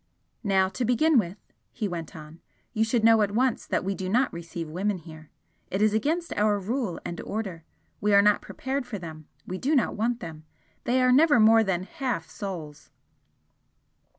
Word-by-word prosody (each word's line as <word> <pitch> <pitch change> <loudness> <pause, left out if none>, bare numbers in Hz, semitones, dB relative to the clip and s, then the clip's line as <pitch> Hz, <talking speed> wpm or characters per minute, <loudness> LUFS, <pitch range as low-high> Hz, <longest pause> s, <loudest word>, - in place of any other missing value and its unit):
"Now, 190 -2 +3
to 190 +6 -4
begin 250 +5 +4
with," 185 -1 -3 0.3
he 220 -4 -3
went 170 -4 -6
on 155 +1 -11 0.3
"you 220 -1 +2
should 225 0 0
know 225 -1 +6
at 205 - +2
once 245 +3 0
that - - 0
we 195 +1 -1
do 190 -1 -4
not 250 +6 +2
receive 170 -1 -6
women 190 +5 -1
here. 155 -2 -13 0.4
It 190 - -2
is 215 0 +3
against 315 +10 0
our 210 0 +2
rule 205 -2 -3
and 170 - -5
Order. 195 -6 -5 0.4
We 210 - +1
are 200 - +8
not 210 0 +4
prepared 265 -1 -4
for 230 -4 -5
them, 160 -4 -9 0.2
we 185 +1 -5
do 295 +4 +1
not 265 - +1
want 235 +3 0
them. 160 -6 -8 0.4
They 255 +1 +2
are 255 - +4
never 290 0 +5
more 225 +1 +6
than 185 -3 -1
HALF 255 - -3
souls!" 165 -8 -7
210 Hz, 185 wpm, -26 LUFS, 175-240 Hz, 0.4 s, are